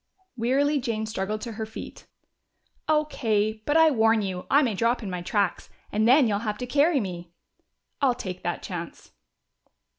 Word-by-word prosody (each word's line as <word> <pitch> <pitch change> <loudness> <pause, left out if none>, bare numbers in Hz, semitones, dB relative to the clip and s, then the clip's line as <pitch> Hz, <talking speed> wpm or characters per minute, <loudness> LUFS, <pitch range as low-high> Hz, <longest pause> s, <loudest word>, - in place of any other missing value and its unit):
Wearily 275 +5 +1
Jane 230 -4 -2
struggled 215 0 -3
to 235 - -5
her 220 0 -4
feet. 220 - -10 0.8
"O.K. 220 -9 0
But 295 +2 +3
I 320 -1 +6
warn 225 -3 +3
you, 185 -2 -4
I 285 +2 +5
may 235 -5 0
drop 230 +4 0
in 195 - -4
my 180 -1 -4
tracks, 200 +1 -1 0.2
and 215 +2 +2
then 260 +1 +6
you'll 205 -2 0
have 210 -1 -3
to 250 - -4
carry 285 +4 +3
me." 175 -5 -6 0.7
"I'll 260 -3 +3
take 185 -6 -6
a 175 0 -1
chance." 170 -2 -8
220 Hz, 170 wpm, -26 LUFS, 200-260 Hz, 0.8 s, I